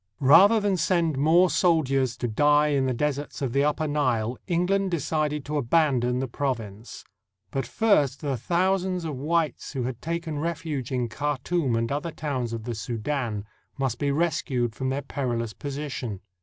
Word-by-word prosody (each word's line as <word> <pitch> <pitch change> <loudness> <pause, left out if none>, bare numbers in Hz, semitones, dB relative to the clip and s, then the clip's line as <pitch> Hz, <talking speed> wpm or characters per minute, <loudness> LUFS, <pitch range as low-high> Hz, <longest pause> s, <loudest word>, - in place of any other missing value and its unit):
Rather 175 +11 +7
than 205 -2 +1
send 165 -2 +1
more 160 +6 +5
soldiers 135 -9 +2
to 120 - -2
die 150 +6 +3
in 135 -2 +1
the - - +1
deserts 145 +3 -2
of 130 -4 -2
the 140 +1 +3
Upper 150 +1 0
Nile, 125 -6 0
England 190 +2 +1
decided 150 -3 -1
to 150 +1 -2
abandon 125 -3 +2
the 130 +1 -1
province. 115 -5 -4 0.5
But 135 -3 -2
first 150 - +2
the 140 -3 -1
thousands 180 - 0
of 155 -3 -3
whites 155 +3 -1
who 130 -3 -2
had 120 -1 -4
taken 165 -2 -3
refuge 155 -5 -3
in 125 -2 0
Khartoum 145 +2 -1
and 115 +2 -1
other 150 +4 -2
towns 135 -7 -3
of 115 -1 -4
the 120 +1 -4
Soudan 115 -1 -3 0.3
must 130 -4 -1
be 145 - 0
rescued 140 -6 0
from 130 +3 -3
their 140 +2 -2
peril 125 -4 -2
ous 110 -2 -6
position. 135 -5 -5
145 Hz, 170 wpm, -26 LUFS, 125-160 Hz, 0.5 s, Rather